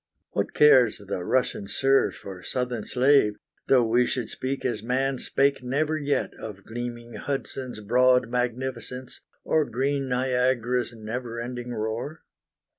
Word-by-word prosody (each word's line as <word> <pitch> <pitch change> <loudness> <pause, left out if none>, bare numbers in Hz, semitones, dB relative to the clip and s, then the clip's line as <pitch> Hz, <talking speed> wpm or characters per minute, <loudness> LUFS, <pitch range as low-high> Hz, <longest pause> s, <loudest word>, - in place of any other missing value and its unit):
What - - -2
cares 130 -7 +6
the 100 -3 -5
Russian 125 -3 0
serf 135 +5 +2
or 95 -2 -7
Southern 125 -1 -3
slave 130 -5 +4 0.3
Though 125 -3 +5
we 120 +2 +3
should 125 -4 -2
speak 135 +1 -4
as 120 -5 -1
man 130 +3 0
spake 140 0 +1
never 145 +5 0
yet 145 -2 0
Of 100 -3 -8
gleaming 120 +1 -6
Hudson's 135 -4 -4
broad 125 +3 +4
magnificence, 125 +1 -3 0.2
Or 155 - +2
green 135 +1 -1
Niagara's 125 -1 +1
never 115 +1 -5
ending 120 0 -5
roar? 110 +8 -4
125 Hz, 130 wpm, -26 LUFS, 115-130 Hz, 0.3 s, cares